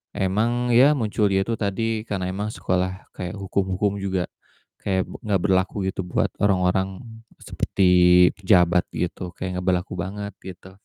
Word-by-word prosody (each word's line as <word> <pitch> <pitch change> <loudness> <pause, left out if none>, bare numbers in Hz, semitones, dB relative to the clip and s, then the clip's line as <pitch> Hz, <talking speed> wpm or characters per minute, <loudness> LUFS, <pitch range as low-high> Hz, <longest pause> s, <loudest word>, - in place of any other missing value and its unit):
emang 115 +6 0
ya, 135 +5 +6
muncul, 105 -4 0
ya, 95 0 +2
itu 115 +1 -2
tadi, 110 +2 -2
karena 95 -2 -2
emang 100 +3 -3
sekolah 95 0 -2
kayak 90 +2 -5
hukum-hukum 100 0 -1
juga 95 -2 -1 0.6
kayak, 95 -1 0
be - - -9
enggak 100 -4 +1
berlaku 95 -1 +1 0.2
gitu, 95 - -4
buat - - 0
orang-orang 95 0 +1 0.4
seperti 95 - -2 0.5
pejabat, 90 -3 +3
gitu, 90 0 -4
kayak 90 -1 -4
enggak 90 - -7
berlaku 90 +3 -4
banget, 100 +2 -6
gitu, 95 0 -11
95 Hz, 150 wpm, -23 LUFS, 95-105 Hz, 0.6 s, ya